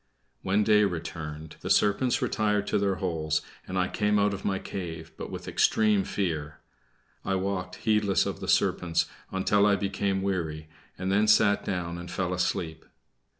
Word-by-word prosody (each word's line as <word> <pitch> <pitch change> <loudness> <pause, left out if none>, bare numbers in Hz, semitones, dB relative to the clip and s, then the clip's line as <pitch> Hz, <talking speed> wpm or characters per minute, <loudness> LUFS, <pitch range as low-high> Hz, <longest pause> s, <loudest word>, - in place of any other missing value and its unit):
When 100 +3 +2
day 105 0 +5
returned, 80 -4 -4
the - - -5
serpents 125 +6 +3
retired 105 -4 +1
to - - +1
their 100 -1 +1
holes; 80 -4 -1 0.2
and 95 - -3
I 90 -1 +2
came 105 +1 +1
out 100 0 +2
of 100 - -6
my 95 -1 0
cave, 80 -5 -6
but - - -7
with - - -7
extreme 105 -3 +3
fear. 80 -6 -2 0.7
I 95 - 0
walked 95 -1 -2
heedless 105 -3 +2
of - - -4
the - - -6
serpents 85 -2 +2 0.3
until 100 +2 +3
I 100 - +4
became 100 -1 -1
weary, 80 -5 -2 0.3
and 95 +1 -2
then 105 +2 +3
sat 105 -1 +4
down 85 -2 -3
and 90 - -8
fell 90 -1 -2
asleep. 90 -3 -2
95 Hz, 165 wpm, -27 LUFS, 85-100 Hz, 0.7 s, day